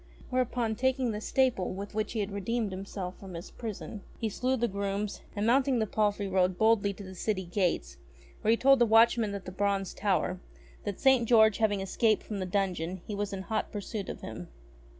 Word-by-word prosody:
Whereupon, 245 -3 0
taking 260 0 +1
the 210 0 -4
staple 245 -8 +1
with 200 +2 -6
which 215 +1 -2
he 220 - 0
had 200 0 -3
redeemed 205 +2 -1
himself 190 -1 -6
from 190 -3 -8 0.2
prison, 220 -2 -6 0.2
he 225 - -1
slew 255 +5 0
the 240 0 +1
grooms, 200 0 -3
and 205 0 -1
mounting 260 +2 +3
the 220 - +1
palfrey 205 -1 0
rode 185 -1 +2
boldly 220 -2 +3
to 200 - -10
the 190 -1 -9
city 190 0 -2
gates 175 - -1 0.4
where - - 0
he 230 - +5
told 275 +1 +5
the 240 - +5
watchman 225 -1 +4
at 195 - -7
the 185 - -6
Bronze 195 0 0
Tower, 185 -2 0 0.5
that 205 -2 -3
St. 260 -4 +4
George 220 -3 +6
having 205 -3 +2
escaped 215 +3 +1
from 210 -2 -5
the 185 - -2
dungeon, 185 -2 -1
he 210 - -5
was 205 0 -2
in 190 -1 -4
hot 220 +2 -2
pursuit 205 -1 -5
of - - -6
him. 110 -6 -7
205 Hz, 200 wpm, -30 LUFS, 190-225 Hz, 0.5 s, George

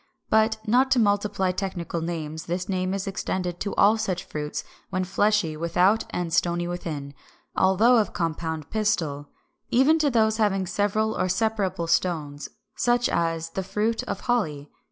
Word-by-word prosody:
But, 220 0 +3
not 255 +4 +4
to 255 - +4
multiply 205 -3 +1
technical 180 -3 -3
names, 160 -2 -4
this 180 +1 -2
name 185 -1 -1
is 195 0 -3
extended 185 -2 -3
to 200 - -3
all 215 +2 +5
such 190 -5 -2
fruits 150 -1 -4 0.3
when 185 -1 -1
fleshy 190 -3 +1
without 180 +6 +2
and 175 -2 -3
stony 175 0 +1
within, 155 -5 -5 0.4
although 215 +6 +4
of 215 - +1
compound 160 -3 -3
pistil, 165 -10 -1 0.4
even 275 +6 +4
to 300 -2 +3
those 220 -3 +2
having 195 -3 +1
several 210 +3 0
or 185 - 0
separable 200 -3 0
stones, 155 -4 -1 0.3
such 240 0 +2
as 165 -1 -1
the 190 - -2
fruit 210 +5 -1
of - - -4
Holly. 150 - -1
190 Hz, 155 wpm, -25 LUFS, 170-215 Hz, 0.4 s, all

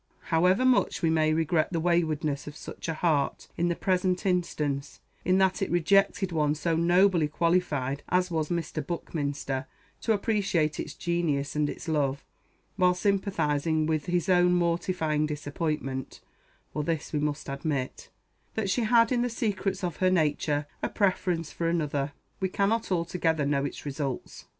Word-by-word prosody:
However 180 +9 +4
much 255 -7 +2
we 165 - +3
may 155 -1 +3
regret 160 +1 +1
the 170 - 0
waywardness 160 -4 0
of 150 - -7
such - - -8
a 165 - -1
heart 155 -4 0
in 175 - +1
the 170 - 0
present 185 0 0
instance, 150 -6 -1 0.2
in 185 +1 +3
that 190 -1 +2
it - - 0
rejected 190 +2 +2
one 150 -2 +1
so 165 +2 0
nobly 175 0 +4
qualified 150 -4 0
as 180 0 +1
was 155 -2 -1
Mr. 170 -2 -2
Buckminster 140 -5 -3 0.3
to 230 - 0
appreciate 200 -8 +1
its - - -5
genius 160 -5 -1
and 150 -1 +1
its - - -7
love, 140 -3 0 0.5
while 180 -1 +4
sympathizing 165 -6 +1
with 155 -2 -1
his 175 -2 0
own 180 -1 +4
mortifying 170 -3 +1
disappointment, 145 -2 -3 0.5
(for 150 - -1
this 160 0 -2
we 150 - +1
must 150 0 -2
admit,) 140 -1 -3 0.5
that 205 -3 0
she 225 +5 +1
had 230 +1 +4
in 245 -1 +2
the 245 - 0
secrets 200 -5 -2
of 175 -3 -2
her 185 - +3
nature 150 -4 +1 0.2
a - - -1
preference 180 -5 0
for 165 -1 -1
another, 145 -4 -1 0.3
we 190 - 0
cannot 200 +3 0
altogether 165 -3 0
know 140 -1 +1
its 145 - -6
results. 140 -2 -4
165 Hz, 160 wpm, -28 LUFS, 150-185 Hz, 0.5 s, However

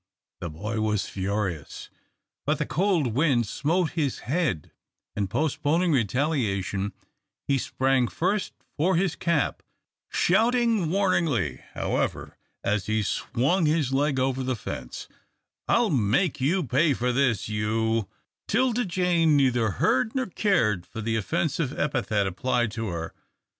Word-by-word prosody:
The 85 - -4
boy 105 +9 -4
was 105 -2 0
furious, 95 -5 -3 0.5
but - - +1
the - - -1
cold 175 - +1
wind 130 -3 +2
smote 160 - 0
his 150 -6 -1
head, 140 - -1 0.4
and, 100 -2 -1
postponing 160 - +1
retaliation, 105 - 0 0.5
he 140 -1 +2
sprang 130 -1 +1
first 190 - -1 0.2
for 180 +5 +2
his 180 0 +1
cap, 170 -4 0 0.5
shouting 225 -2 +2
warningly, 165 - +1
however, - - -2 0.3
as 105 -1 0
he 110 0 +1
swung 140 - +1
his 150 -4 +1
leg 140 0 +1
over 130 0 0
the 130 0 -1
fence, 65 - -7 0.6
"I'll 235 -4 +3
make 130 - +1
you 175 +8 +2
pay 140 +4 +2
up - - -5
for 125 +1 0
this, 120 -6 +1
you 110 0 0 0.2
" - - -65
'Tilda 245 +1 +1
Jane 170 -4 +2
neither 125 -5 +2
heard 130 - +1
nor 260 -1 +1
cared 160 - +1
for 110 - -7
the 110 +1 -1
offensive 150 - -1
epithet 120 -8 0
applied 120 +4 0
to 115 0 -4
her. 85 -3 -4
135 Hz, 135 wpm, -26 LUFS, 110-170 Hz, 0.6 s, I'll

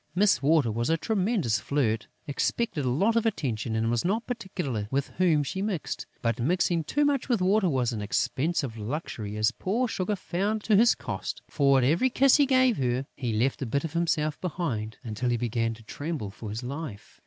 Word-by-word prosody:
Miss 195 -8 +4
Water 145 -4 +3
was 115 +4 -1
a 165 - +3
tremendous 190 - 0
flirt, 115 -7 0 0.2
expected 150 - -1
a - - +1
lot 195 - +2
of 230 - +3
attention 120 - -1
and 115 +1 +1
was 120 -1 0
not 215 +6 0
particular 180 - -3
with 140 +2 -1
whom 165 -5 +4
she 190 +7 -4
mixed; 195 -6 -3 0.2
but 115 -1 0
mixing 170 +4 +1
too 290 - +1
much 280 -2 0
with 235 -4 +2
Water 190 +1 +3
was 130 -4 0
an 110 - -3
expensive 130 +3 -1
luxury, 105 -3 -4
as 110 +2 +3
poor 220 - -1
Sugar 205 -2 -1
found 200 +3 -2
to 215 - +3
his 230 +4 +5
cost; - - -5
for, 140 -2 +3
at 130 - +3
every 165 - +3
kiss 265 +1 +5
he 285 -2 +4
gave 255 -3 +4
her, 125 0 0
he 125 -4 -2
left 120 +7 0
a 130 - -2
bit 140 +5 0
of 160 -2 -4
himself 155 -3 0
behind, 125 - -3
until 115 +2 -2
he 120 - +1
began 115 -1 -1
to 115 - -16
tremble 145 -3 -5
for 110 0 -8
his 110 +4 -5
life. 135 -4 -7
145 Hz, 200 wpm, -27 LUFS, 120-195 Hz, 0.2 s, his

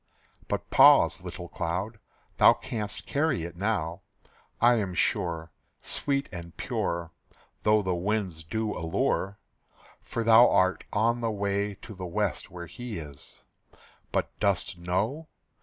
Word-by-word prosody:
But - - -3
pause, - - +6
little - - -7
cloud, 95 +7 -3 0.4
thou - - +8
canst 105 -3 -4
carry 145 - 0
it 85 0 -6
now, 95 -3 -1 0.6
I 120 +1 +5
am 95 -4 -2
sure, 80 -2 0 0.3
Sweet 140 -1 -2
and 85 -3 -9
pure, 85 -1 -2 0.5
Though 105 0 +3
the 95 -1 0
winds 95 -2 -2
do 110 +6 -2
allure; 95 +2 -1 0.6
For 115 - -3
thou 115 +2 +7
art 95 0 +2
on 115 +3 +1
the 115 - 0
way 100 -1 -1
to 110 - -8
the 95 -2 -6
west 95 -3 -2
where 85 -1 -8
he 120 +5 -7
is. 75 -4 -10 0.7
But - - 0
dost 100 -3 +1
know? 100 - -2
100 Hz, 135 wpm, -28 LUFS, 85-110 Hz, 0.7 s, thou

